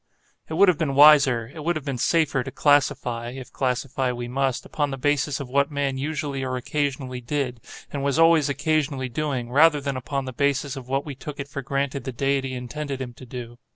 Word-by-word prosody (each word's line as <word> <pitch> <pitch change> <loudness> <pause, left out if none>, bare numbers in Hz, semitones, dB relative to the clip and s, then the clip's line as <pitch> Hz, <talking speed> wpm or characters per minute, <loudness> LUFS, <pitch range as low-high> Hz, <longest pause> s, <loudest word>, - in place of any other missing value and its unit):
It 160 - -3
would 200 +4 +6
have 180 -4 +3
been 145 -4 0
wiser, 140 -5 +6
it 160 - -9
would 170 +2 +1
have 155 -2 -5
been 135 -4 -3
safer, 155 -3 +2
to 135 - -6
classify 125 -5 +1
(if 130 0 -9
classify 130 0 -1
we 120 0 -5
must) 135 0 -1
upon 145 -1 -1
the 135 - -4
basis 145 0 0
of 140 - -5
what 140 +2 +2
man 140 -2 -1
usually 145 -1 -3
or 130 -1 -2
occasionally 130 -1 -2
did, 125 -2 -3 0.3
and 140 -1 -3
was 140 +1 +1
always 165 -3 +5
occasionally 145 -2 0
doing, 130 -3 -3
rather 150 +2 +5
than 140 -1 -3
upon 135 +2 -3
the 130 - -6
basis 140 +1 0
of 130 -2 -8
what 135 +2 -1
we 145 - -5
took 140 +2 -8
it 140 - -4
for 140 0 -5
granted 140 +1 -2
the 130 - -3
Deity 135 +1 -1
intended 135 +3 -5
him 125 -2 -5
to 130 +1 -13
do. 120 -1 -8
140 Hz, 215 wpm, -24 LUFS, 130-145 Hz, 0.3 s, would